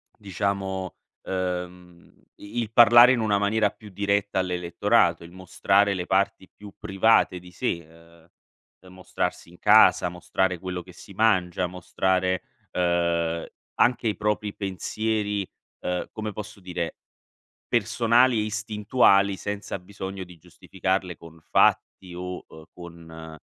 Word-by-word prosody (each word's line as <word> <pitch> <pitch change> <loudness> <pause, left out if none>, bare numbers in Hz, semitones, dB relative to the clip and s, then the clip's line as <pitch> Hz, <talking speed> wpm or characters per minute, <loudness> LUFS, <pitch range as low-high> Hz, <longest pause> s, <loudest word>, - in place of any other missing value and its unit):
diciamo, 95 -2 -3 0.3
ehm, 90 -1 -5 0.2
i 105 +4 -6
il 110 - -5
parlare 120 +1 +8
in 130 - +1
una 105 -2 +1
maniera 105 +1 +1
più 105 +1 -15
diretta 100 0 -1
all'elettorato, 90 -2 +1
il 85 - -12
mostrare 100 +2 +1
le 90 -2 -4
parti 95 0 0
più 100 -1 -13
private 95 -2 +2
di 90 0 -15
sé. 85 -1 -3 0.9
Uhm, 90 0 -16
mostrarsi 90 -2 -4
in 90 - -18
casa, 105 -3 +5
mostrare 90 +1 -2
quello 90 0 -5
che 90 0 -15
si 100 - -14
mangia, 95 -4 +1
mostrare, 90 +1 -1 0.3
uhm, 85 -2 0 0.3
anche 120 -1 +2
i 105 - 0
propri 105 -1 -2
pensieri, 105 +1 -2 0.3
uhm, 90 0 -3
come 110 -1 -5
posso 105 0 -9
dire, 90 -2 -4 0.7
personali 120 +2 +3
e 105 - +1
istintuali 105 -2 +2
senza 100 0 -5
bisogno 95 +1 -7
di 90 -1 -15
giustificarle 90 +2 -3
con 85 0 -15
fatti 90 +3 +1
o, 90 +1 -6
uhm, 80 0 -14
con, 80 -2 -11
95 Hz, 130 wpm, -25 LUFS, 90-105 Hz, 0.9 s, parlare